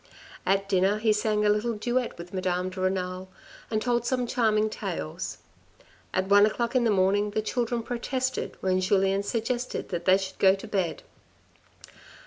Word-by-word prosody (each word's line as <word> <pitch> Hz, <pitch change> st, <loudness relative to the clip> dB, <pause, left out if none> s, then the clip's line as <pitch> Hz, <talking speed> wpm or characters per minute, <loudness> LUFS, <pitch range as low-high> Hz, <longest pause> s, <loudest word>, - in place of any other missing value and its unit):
After 195 Hz, 0 st, +2 dB
dinner 195 Hz, +3 st, +3 dB
he 215 Hz, 0 st, +2 dB
sang 210 Hz, 0 st, +1 dB
a -, -, +4 dB
little 210 Hz, +3 st, +1 dB
duet 240 Hz, +3 st, -1 dB
with 170 Hz, +2 st, -10 dB
Madame 185 Hz, 0 st, -1 dB
de 185 Hz, 0 st, -6 dB
Renal, 185 Hz, 0 st, -2 dB, 0.4 s
and 215 Hz, -, 0 dB
told 240 Hz, +1 st, 0 dB
some 250 Hz, +1 st, 0 dB
charming 220 Hz, -3 st, +2 dB
tales. 80 Hz, -, -5 dB, 0.7 s
At 185 Hz, +1 st, 0 dB
one 205 Hz, +1 st, +6 dB
o'clock 235 Hz, +3 st, -2 dB
in 245 Hz, -2 st, +3 dB
the -, -, +3 dB
morning 200 Hz, +1 st, +2 dB
the 215 Hz, +1 st, -1 dB
children 235 Hz, +1 st, -1 dB
protested, 255 Hz, +2 st, -3 dB
when 185 Hz, 0 st, +1 dB
Julien 195 Hz, +1 st, +2 dB
suggested 240 Hz, +4 st, -3 dB
that 175 Hz, -2 st, -4 dB
they 185 Hz, 0 st, +6 dB
should 190 Hz, -1 st, -6 dB
go 190 Hz, -1 st, +6 dB
to 200 Hz, +3 st, -9 dB
bed. 190 Hz, -5 st, -2 dB
205 Hz, 165 wpm, -27 LUFS, 190-230 Hz, 0.7 s, one